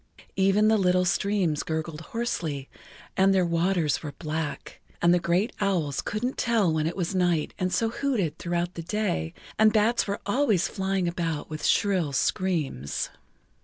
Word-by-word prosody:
Even 195 +2 +3
the 220 0 +4
little 180 -1 +3
streams 185 -4 +1
gurgled 160 0 -4
hoarsely 165 - -3 0.5
and 195 +1 +4
their 185 -2 +3
waters 170 -3 +1
were 150 -3 -6
black, 155 0 -5 0.2
and 170 0 +4
the 180 - +4
great 180 +7 +1
owls 170 -9 0
couldn't 245 +5 -3
tell 220 -8 +2
when 155 0 0
it 170 - -4
was 180 0 -1
night 175 -4 +1
and 185 0 0
so 225 +3 +1
hooted 230 - -1
throughout 175 0 -2
the 170 - -6
day, 170 - -1 0.3
and 220 0 +6
bats 220 +2 +2
were 200 +1 -2
always 210 -4 +2
flying 190 -2 -1
about 165 -3 -3
with 155 - -5
shrill 185 -8 +2
screams. 145 - -1
180 Hz, 160 wpm, -26 LUFS, 160-200 Hz, 0.5 s, and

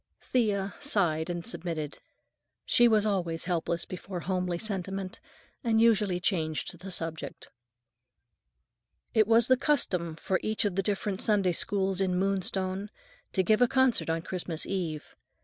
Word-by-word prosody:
Thea 205 -5 0
sighed 180 - +1
and 175 -1 -3
submitted. 165 -9 -4 0.7
She 240 -2 +5
was 215 -2 +4
always 175 -6 -1
helpless 170 -1 -1
before 185 0 -6
homely 180 -1 -1
sentiment 195 -1 -3 0.4
and 225 -2 +2
usually 210 -5 +3
changed 160 -4 -1
the 190 +2 -8
subject. 165 -3 -5 1.6
It 215 -2 +4
was 230 +1 +5
the 255 - +5
custom 180 - +1
for 185 +3 -1
each 215 0 0
of 205 - +1
the 195 - +1
different 200 0 -1
Sunday 200 -4 +3
Schools 195 +2 +1
in 185 -2 +1
Moonstone 190 +1 -1 0.4
to 190 - +2
give 215 +5 +3
a 245 - +6
concert 260 -7 +2
on 165 0 -1
Christmas 175 -3 -3
Eve. 170 -6 -4
190 Hz, 140 wpm, -29 LUFS, 175-215 Hz, 1.6 s, a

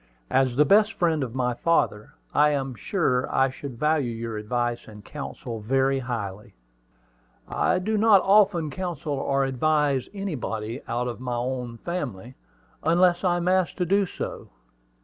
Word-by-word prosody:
"As 130 -1 +2
the 150 +3 +5
best 210 +7 +4
friend 160 -4 +1
of 125 -1 -6
my 125 -1 0
father, 120 -6 0 0.2
I 150 +1 +5
am 135 -3 -1
sure 125 - 0
I 135 0 +2
should 130 -2 -8
value 150 -2 +1
your 115 -1 -5
advice 120 +2 -2
and 105 -1 -12
counsel 130 -5 -6
very 135 +5 +1
highly." 105 - -5 0.9
"I - - +1
do 210 +4 -1
not 210 -3 +6
often 195 -6 +4
counsel 165 -3 -4
or 135 0 0
advise 140 0 +1
anybody 130 - -4
out 120 +2 -1
of 120 -1 -5
my 125 -1 -3
own 125 -1 -3
family, 125 - -5 0.5
unless 175 +2 +3
I 175 -2 +2
am 175 0 -2
asked 185 -1 +2
to 180 - 0
do 195 +2 +2
so. - - -6
135 Hz, 155 wpm, -25 LUFS, 120-175 Hz, 0.9 s, not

